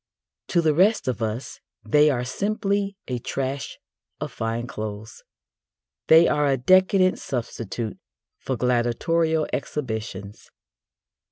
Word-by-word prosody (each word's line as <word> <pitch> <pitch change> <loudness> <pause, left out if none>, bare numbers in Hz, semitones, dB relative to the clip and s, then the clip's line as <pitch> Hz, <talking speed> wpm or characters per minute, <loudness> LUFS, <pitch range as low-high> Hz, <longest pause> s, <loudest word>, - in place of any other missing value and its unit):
To 170 - +2
the 155 -2 +3
rest 195 +5 +3
of 120 -3 -2
us 110 +3 -4 0.2
they 150 0 +4
are 125 -4 0
simply 200 - -1
a 125 -2 -2
trash 135 +3 -4 0.4
of - - -4
fine 115 +1 -3
clothes. 110 -1 -7 0.9
They 165 +1 +7
are 150 -1 +2
a 135 -1 +2
decadent 185 +6 +4
substitute 115 -3 -4 0.4
for 130 - -3
gladiatorial 150 +7 +1
exhibitions. 110 -8 -5
135 Hz, 110 wpm, -24 LUFS, 115-165 Hz, 0.9 s, They